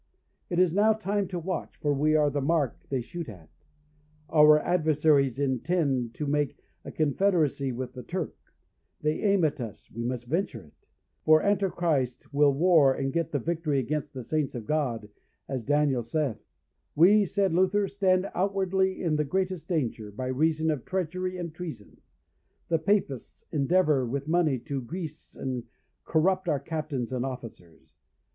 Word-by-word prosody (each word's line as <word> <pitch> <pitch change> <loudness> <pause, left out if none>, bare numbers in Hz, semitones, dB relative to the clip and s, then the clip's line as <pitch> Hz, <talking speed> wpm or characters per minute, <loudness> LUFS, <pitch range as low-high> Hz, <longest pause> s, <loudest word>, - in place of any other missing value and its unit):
It 175 - -2
is 180 -2 +4
now 210 +3 +4
time 205 -2 -1
to 180 - -4
watch, 175 +1 -4
for 145 -1 0
we 150 +2 +2
are 150 -1 +3
the 145 0 -1
mark 145 -3 -1
they 135 -2 -1
shoot 170 +4 -7
at; 90 -7 -13 0.8
our 150 -1 +7
adversaries 150 -6 +2
intend 135 -2 0
to 150 - -3
make 145 -1 0 0.3
a - - -7
confederacy 155 -3 +1
with 125 +1 -5
the 125 - -7
Turk; 175 +3 -4 0.7
they 150 +1 0
aim 200 -5 +3
at 150 -3 -1
us, 115 -4 -8
we 115 +2 -5
must 120 0 -3
venture 145 - -2
it; 75 - -20 0.5
for 155 0 +5
Antichrist 175 -11 0
will 145 0 +5
war 155 -1 +5
and 135 0 -2
get 165 -2 -1
the 145 - 0
victory 155 +1 -1
against 145 +3 -2
the 130 - -5
saints 150 +1 -1
of 115 -3 -5
God, 125 -8 -1 0.4
as 130 -2 -3
Daniel 145 0 +2
saith. 135 +1 -2 0.5
We, 200 +7 +6
said 195 -1 +1
Luther, 190 +3 +2
stand 190 -1 +1
outwardly 190 0 0
in 155 -3 +1
the 150 - +2
greatest 185 +1 -2
danger, 120 - -2
by 130 +5 -4
reason 160 +4 +1
of 145 -5 -3
treachery 185 0 -2
and 170 -3 -5
treason; 160 -11 -9 0.7
the 165 -1 +2
Papists 180 - -1
endeavour 150 -1 +2
with 135 +4 -3
money 160 -4 +2
to 140 0 -4
grease 155 +4 -7
and 130 -3 -4 0.4
corrupt 185 +3 +1
our 145 - +1
captains 140 -5 -4
and 125 -1 -1
officers. 115 -11 -9
155 Hz, 160 wpm, -27 LUFS, 135-180 Hz, 0.8 s, our